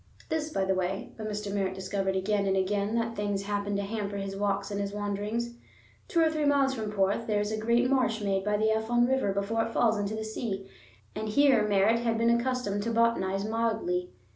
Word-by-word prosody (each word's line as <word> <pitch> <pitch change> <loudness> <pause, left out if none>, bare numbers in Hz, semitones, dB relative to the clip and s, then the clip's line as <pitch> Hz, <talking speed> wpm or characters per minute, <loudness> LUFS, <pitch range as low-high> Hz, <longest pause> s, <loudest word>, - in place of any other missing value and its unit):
This 315 -1 -1
by 195 -11 0
the 190 - +2
way; 185 +1 -2
but 215 -1 -5
Mr. 210 -1 -4
Merritt 190 -2 -1
discovered 190 0 -2
again 200 +1 +1
and 190 0 +2
again 200 +3 0
that 230 0 -1
things 205 -1 -1
happened 205 0 -1
to 200 - -1
hamper 205 -1 -3
his 195 0 -4
walks 200 0 -1
and 200 0 -2
his 200 0 -2
wanderings. 210 +3 -3 0.5
Two 335 - +2
or 320 -1 +4
three 310 -1 -1
miles 280 -2 +3
from 220 -4 -4
Porth 200 +2 0
there 210 -2 +1
is 210 +1 -1
a 220 - -1
great 235 +3 +2
marsh 250 -4 +2
made 195 -2 0
by 210 +1 +1
the 220 +1 +2
Afon 230 +2 +2
river 265 -5 +1
before 200 +3 0
it 230 - -3
falls 225 -3 +3
into 205 +1 -2
the 220 0 -4
sea, 210 -3 -4 0.5
and 215 0 -4
here 260 -3 +4
Merritt 205 +3 +3
had 230 -1 0
been 230 +1 +3
accustomed 235 -4 0
to 225 - -2
botanize 210 -4 +1
mildly. 230 +12 -1
210 Hz, 215 wpm, -29 LUFS, 200-230 Hz, 0.5 s, or